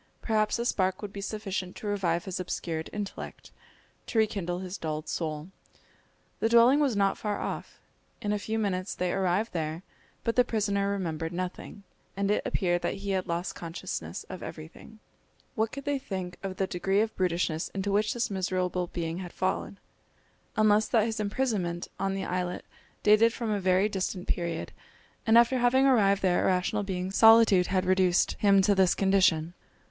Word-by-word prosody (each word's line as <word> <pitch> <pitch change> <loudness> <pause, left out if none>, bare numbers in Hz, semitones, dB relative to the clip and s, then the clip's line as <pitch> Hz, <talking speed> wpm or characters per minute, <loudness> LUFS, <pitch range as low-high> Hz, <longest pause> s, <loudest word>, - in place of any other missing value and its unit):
Perhaps 215 -1 +1
a 235 - -2
spark 190 -3 0
would 205 -1 -6
be 200 - -6
sufficient 195 -3 -4
to - - -9
revive 180 -5 0
his 190 -2 -4
obscured 165 -3 -4
intellect, 205 -1 -7 0.6
to 230 - -3
rekindle 195 -5 0
his 185 0 -6
dulled 155 -3 -4
soul. 155 0 -3 0.9
The 225 - +1
dwelling 235 +4 +6
was 275 -6 +2
not 195 -1 +1
far 210 -1 -2
off. - - -5 0.4
In 205 0 -1
a 210 - -1
few 220 +2 -3
minutes 195 -3 -1
they 180 -1 -1
arrived 195 +4 0
there, 160 +1 -3 0.4
but 230 - 0
the 250 - +6
prisoner 200 -4 0
remembered 165 -5 -2
nothing, 185 +3 -5 0.3
and 200 0 +1
it 210 - +2
appeared 175 -2 0
that - - -1
he 200 - -1
had 190 -1 -1
lost 170 +2 -2
consciousness 125 - -6
of 185 - -8
everything. 160 +7 -10 0.6
What 220 0 0
could 275 0 -7
they 285 -1 0
think 185 -7 -5
of 195 -1 -4
the 195 - +1
degree 195 +3 0
of 220 0 -2
brutishness 170 -3 0
into 195 +1 -3
which 210 +2 +1
this 240 -2 -1
miserable 185 -2 -1
being 170 0 -4
had 180 -2 -7
fallen, 190 +1 -2 0.8
unless 215 0 +4
that 225 -3 +3
his 225 -1 -3
imprisonment 200 -6 -1
on 195 0 -1
the 195 - -3
islet 180 0 -3 0.4
dated 215 +2 +5
from 230 -3 -3
a 205 - 0
very 185 +1 +3
distant 190 -2 -3
period, 170 -2 -2 0.6
and 225 +1 +6
after 235 +2 +5
having 250 +2 +4
arrived 200 -7 +4
there 180 -2 +3
a - - +2
rational 185 +3 +1
being 190 -2 -3
solitude 225 -3 +6
had 185 -1 0
reduced 185 -1 +3
him 195 -2 +5
to 205 +1 +4
this 190 -2 +3
condition. 185 -4 +2
195 Hz, 175 wpm, -28 LUFS, 180-215 Hz, 0.9 s, dwelling